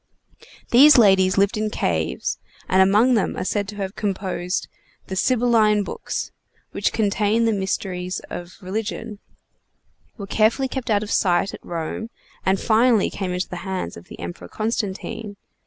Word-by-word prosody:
These 275 +4 +8
ladies 190 -4 +5
lived 200 +3 +2
in 215 0 -1
caves, 80 - -1 0.3
and 190 +1 +4
among 210 +7 +5
them 220 - 0
are - - -2
said 200 +1 -1
to 205 - -7
have 195 -1 -4
composed 185 -3 -2 0.4
the 190 - -5
Sibylline 225 -2 +3
books, - - -5 0.4
which - - 0
contained 215 +2 +1
the - - +3
mysteries 190 -2 -2
of 175 +1 -7
religion, 205 +2 -4 1.0
were 200 - -6
carefully 220 +6 +2
kept 260 -2 -5
out 210 -1 +2
of 210 - -6
sight 180 0 +2
at - - -10
Rome, 170 +6 -4 0.3
and 190 0 +2
finally 230 -1 +3
came 190 -2 -3
into 180 +1 -2
the 180 - -5
hands 185 - -4
of 85 - -12
the - - -12
Emperor 85 +1 -7
Constantine. 210 - -4
200 Hz, 155 wpm, -22 LUFS, 185-220 Hz, 1.0 s, These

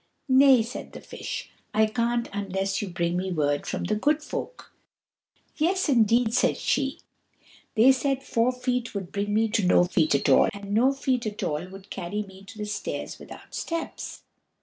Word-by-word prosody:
"Nay," 260 -2 +6
said 235 +4 -8
the - - -8
Fish, - - -6 0.2
"I 220 0 +5
can't 235 +2 0
unless 195 -1 -2
you 205 - -3
bring 170 0 -1
me 185 +1 -2
word 145 -3 0
from - - -3
the - - 0
Good 295 +8 +1
Folk." - - -6 0.8
"Yes, 350 +2 +1
indeed," 230 -2 +3
said 255 - +2
she. 275 0 -1 0.7
"They 240 +4 +7
said 270 0 0
Four 235 -1 +1
Feet 250 -2 -2
would 190 -3 -4
bring 205 +1 -2
me 220 +2 +3
to 210 -1 +1
No 180 0 +5
Feet 165 -4 +2
at 140 - 0
all, 135 - +5
and 200 0 -6
No 245 +5 +4
Feet 260 -3 -1
at 210 -1 -5
all 150 +4 -2
would 195 +1 -13
carry 205 +5 -3
me 190 -1 -14
to 205 - -12
the 210 - -3
stairs 210 0 -4
without - - -12
steps." 335 -1 -5
220 Hz, 180 wpm, -26 LUFS, 195-255 Hz, 0.8 s, They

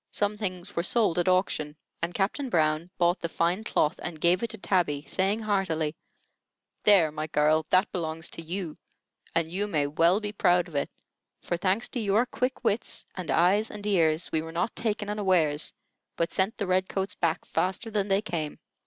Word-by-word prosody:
Some 205 0 -1
things 190 -2 -4
were 170 - +1
sold 190 -2 +3
at 175 - +1
auction, 185 -5 +1 0.3
and 170 +1 -2
Captain 235 +8 -1
Brown 155 -2 +1
bought 175 +1 +2
the 170 - -3
fine 175 +6 0
cloth 150 -8 +1
and 165 -3 -5
gave 175 +3 +3
it 235 - -2
to 220 - -7
Tabby, 175 -8 0
saying 195 +8 0
heartily: 165 -7 0 0.9
"There, 190 -7 +6
my 155 +1 -4
girl, 155 0 +2
that 185 +3 +3
belongs 160 -2 -2
to - - -4
you, 170 0 -5 0.6
and 165 -1 +2
you 200 +3 -1
may 155 -7 +1
well 165 +6 +3
be 210 -1 -4
proud 180 -3 +3
of 170 - -14
it; 140 - -1 0.5
for, - - -1
thanks 190 +6 +1
to 250 - -3
your 215 +2 +2
quick 255 +1 -2
wits 225 -1 -1
and 180 -4 -6
eyes 195 +6 +3
and 210 -1 -8
ears, 165 -5 +2
we 160 - +1
were 160 0 -7
not 175 +7 -1
taken 210 -2 -1
unawares, 185 -8 +1 0.4
but 170 - -1
sent 195 +4 0
the 205 - -1
red 185 0 +1
coats 195 0 -2
back 165 -2 -1
faster 190 +5 -1
than 205 -2 0
they 195 +1 +2
came." 160 -7 -3
180 Hz, 190 wpm, -27 LUFS, 160-205 Hz, 0.9 s, There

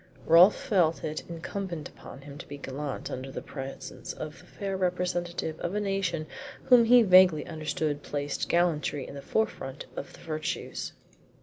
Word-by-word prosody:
Rolfe 170 +5 +8
felt 170 -6 +1
it 155 0 -3
incumbent 170 -1 -5
upon 135 - -12
him 140 0 -10
to - - -9
be 145 -2 -7
gallant 140 0 -5
in 130 - -4
the 135 0 -6
presence 135 -1 -7
of 155 +1 -7
the - - -17
fair 195 -2 -4
representative 175 -3 -1
of 175 +4 -3
a - - +1
nation 195 -6 -1 0.4
whom 245 -2 +7
he 245 +1 +7
vaguely 185 -5 +6
understood 155 -2 -2
placed 145 -1 -3
gallantry 155 -5 +1
in - - -9
the 140 - -7
forefront 150 -9 -2
of - - -6
the - - -14
virtues. 155 -1 -4
165 Hz, 165 wpm, -28 LUFS, 145-185 Hz, 0.4 s, Rolfe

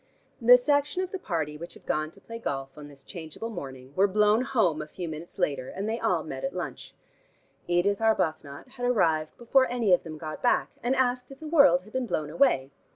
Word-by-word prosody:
The 245 +2 +9
section 290 +6 +1
of 370 - -6
the 385 - -4
party 160 - -3
which 170 +3 -9
had - - -17
gone 155 0 -1
to 195 - -19
play 230 +2 -8
golf 135 -9 -4
on 150 -1 -10
this 140 -2 -16
changeable 175 +6 -7
morning, 130 - -8
were 195 +2 +4
blown 210 +3 +3
home 220 - +1
a 150 - -7
few 175 +3 -6
minutes 160 +2 -8
later, 140 -8 -1
and 195 +3 -4
they 225 +2 -2
all - - +1
met - - -6
at - - -3
lunch. - - -6 0.7
Edith 180 +4 +1
Arbuthnot 160 - 0
had 245 -1 -6
arrived 160 -10 +1
before 260 +2 +3
any 235 -6 +2
of 180 - +4
them 155 -2 -8
got 155 0 -7
back, 245 - +2
and 250 +2 +1
asked 250 -1 0
if 275 - -12
the 315 - -9
world 280 - +5
had 215 - -17
been 260 -1 -1
blown 150 -7 -2
away. 145 - +2
195 Hz, 220 wpm, -27 LUFS, 155-245 Hz, 0.7 s, The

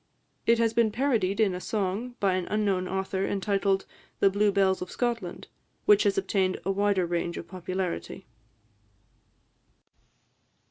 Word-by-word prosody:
It 230 0 +5
has 230 -1 +2
been 230 -2 +3
parodied 225 -6 0
in 210 -4 +3
a 180 - -5
song, 215 +5 -2
by 195 -2 +2
an 185 -1 -2
unknown 200 -3 0
author, 190 0 -2
entitled 195 -1 0 0.3
"The 195 - +4
Blue 205 +1 +2
Bells 195 -1 +2
of 180 - -5
Scotland," 230 -8 -3 0.4
which 210 0 +6
has 200 -1 +2
obtained 190 -1 0
a 195 - +1
wider 200 -2 +2
range 170 0 -2
of 170 - -7
popularity. 185 +1 -4
195 Hz, 140 wpm, -27 LUFS, 185-210 Hz, 0.4 s, which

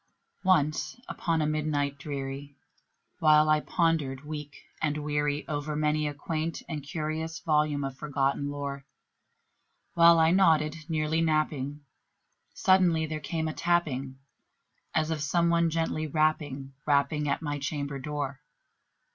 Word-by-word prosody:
Once 160 +4 +2
upon 165 -3 -1
a - - +1
midnight 150 -2 0
dreary, 140 0 -5 0.6
while 155 -1 +5
I 155 0 +5
pondered, 150 -5 0
weak 150 -1 -6 0.3
and 150 -1 0
weary, 145 0 -1
Over 150 0 -3
many 150 0 +1
a 145 - -3
quaint 160 +2 -3
and 155 -3 -4
curious 155 +2 -4
volume 150 -2 +1
of 135 -1 -4
forgotten 140 -1 0
lore 140 -1 -5 1.1
While 170 0 +7
I 160 0 +5
nodded, 160 -5 +4
nearly 160 0 +1
napping, 150 -3 0 0.7
suddenly 180 -4 +4
there 155 0 -4
came 160 +2 -2
a 155 - -3
tapping, 140 -7 0 0.8
As 155 0 +1
of 155 -2 -2
some 170 +3 +2
one 170 0 +3
gently 160 -1 -1
rapping 145 -3 0
rapping 145 +1 +2
at 140 - -1
my 145 -1 -2
chamber 140 0 -3
door. 140 -1 -4
150 Hz, 130 wpm, -28 LUFS, 145-160 Hz, 1.1 s, While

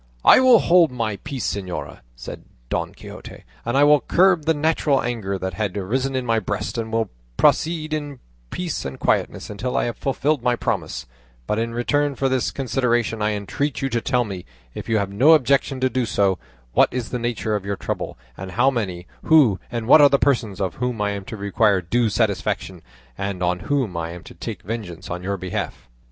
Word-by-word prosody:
"I - - +9
will 255 -2 +7
hold 175 -4 +5
my 115 -5 -2
peace, 130 -1 -3
señora," 95 -3 -5 0.2
said - - -8 0.3
Don - - -1
Quixote, - - -11 0.2
"and 120 +3 -1
I 140 - +6
will 150 0 +6
curb 180 -4 +3
the 160 - +3
natural 150 -2 +2
anger 110 -5 -2
that 95 -1 -4
had 105 +1 -2
arisen 130 +8 -1
in 130 -1 -1
my 115 -1 +2
breast, 105 0 -3
and 110 -1 -4
will 115 -3 -1 0.3
proceed 155 -1 +2
in 145 -2 -4 0.3
peace 180 -3 -3
and 65 -1 -6
quietness - - 0
until 115 +5 -3
I - - +2
have 120 - -2
fulfilled 140 +1 0
my 125 0 +2
promise; - - -3 0.4
but 105 - -1
in 115 0 -2
return 145 +4 +1
for 135 +1 0
this 130 -2 +1
consideration 120 -4 0
I 105 0 +1
entreat 125 +8 -3
you 135 - 0
to 120 -2 -1
tell 125 -1 +1
me, 95 -5 -6 0.3
if - - -7
you 110 - +3
have 100 -2 -1
no 130 +11 +6
objection 140 -1 +2
to 130 - +4
do 125 -1 0
so, 95 -3 +1 0.3
what - - +4
is 125 -3 -3
the 125 - -3
nature 115 -2 -1
of 105 - -3
your 100 0 -2
trouble, - - -4 0.2
and 95 +3 -8
how 125 +8 +3
many, 95 -8 -3 0.2
who, 135 - +5
and 115 -2 -3
what 150 - +8
are 145 - +8
the 140 - +4
persons 120 -9 0
of 95 -4 -2
whom 125 -3 -1
I 105 0 0
am 100 -1 -5
to 110 - -7
require 100 0 +2
due 115 +7 +1
satisfaction, 95 -2 -1 0.4
and 100 -2 -3
on 90 0 +1
whom 130 -10 0
I 85 0 -3
am 85 - -10
to - - -12
take - - -7
vengeance 95 -5 -6
on 90 +1 -4
your 100 +2 -2
behalf?" 95 -1 -5
115 Hz, 205 wpm, -22 LUFS, 100-135 Hz, 0.4 s, I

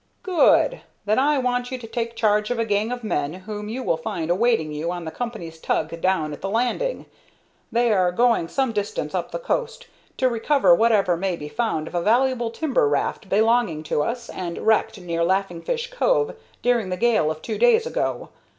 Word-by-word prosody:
"Good! 380 +7 +3 0.2
Then 215 +4 +2
I 290 +2 +3
want 245 -1 0
you 255 - -4
to 245 - -10
take 230 0 -4
charge 210 -1 +2
of 245 - -1
a 230 - 0
gang 210 +2 0
of 245 -1 -4
men 145 -8 -1
whom 210 +2 -7
you 255 +4 -4
will 165 - +1
find 160 +1 -3
awaiting 200 -5 +2
you 155 +3 -3
on 175 -1 -5
the 160 - -5
company's 175 -10 -6
tug 160 +1 -2
down 165 -5 +1
at - - -9
the 195 - -3
landing. 250 - -1 0.7
They 235 0 +2
are 185 -3 +2
going 230 -3 +2
some 265 +5 0
distance 220 - -3
up - - -2
the - - -4
coast, - - -3 0.3
to 260 - +3
recover 235 -4 +3
whatever 200 -3 +3
may 185 +1 -1
be 150 -3 -8
found 220 -7 -2
of - - -10
a 175 - 0
valuable 240 +3 +2
timber 260 - +1
raft 145 +6 -1
belonging 220 -6 +2
to 150 - 0
us, 235 +8 -3
and 170 -2 -5
wrecked 220 -2 +2
near 170 -2 -2
Laughing 185 -1 0
Fish 475 - -3
Cove - - +1 0.3
during 240 -5 +2
the 180 - -2
gale 225 -9 +2
of 155 0 -5
two 220 - -4
days 475 -1 +4
ago. 485 - -2
220 Hz, 200 wpm, -23 LUFS, 175-245 Hz, 0.7 s, days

